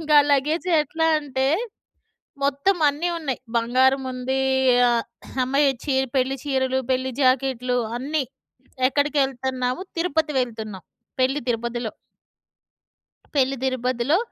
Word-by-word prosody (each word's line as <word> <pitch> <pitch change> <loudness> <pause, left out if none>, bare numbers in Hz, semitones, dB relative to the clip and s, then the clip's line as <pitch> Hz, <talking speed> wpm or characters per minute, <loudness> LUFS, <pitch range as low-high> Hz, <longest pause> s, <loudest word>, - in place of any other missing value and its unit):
ఇంకా 300 -2 +5
లగేజ్ 300 +6 +1
ఎట్లా 320 +2 -1
అంటే, 265 -2 -1 1.0
మొత్తం 285 +7 +1
అన్నీ 320 +5 -2
ఉన్నాయి. 275 -6 -3 0.2
బంగారం 260 +3 +3
ఉంది. 260 +1 -2 0.5
ఆహ్, 235 -1 +1 0.4
అమ్మాయి 275 +2 +3 0.2
చీర 265 -2 +1
పెళ్ళి 265 +1 +1
చీరలు, 260 -1 +1
పెళ్ళి 260 +1 -1
జాకెట్లు 255 -1 +2 0.2
అన్నీ. 290 +2 -1 0.7
ఎక్కడికెళ్తున్నాము? 265 0 0
తిరుపతి 320 -2 0
వెళ్తున్నాం. 220 -6 -6 0.4
పెళ్ళి 270 +3 +1
తిరుపతిలో. 235 -1 -2 1.4
పెళ్ళి 270 0 +2
తిరుపతిలో. 255 +3 +1
265 Hz, 100 wpm, -23 LUFS, 255-290 Hz, 1.4 s, ఇంకా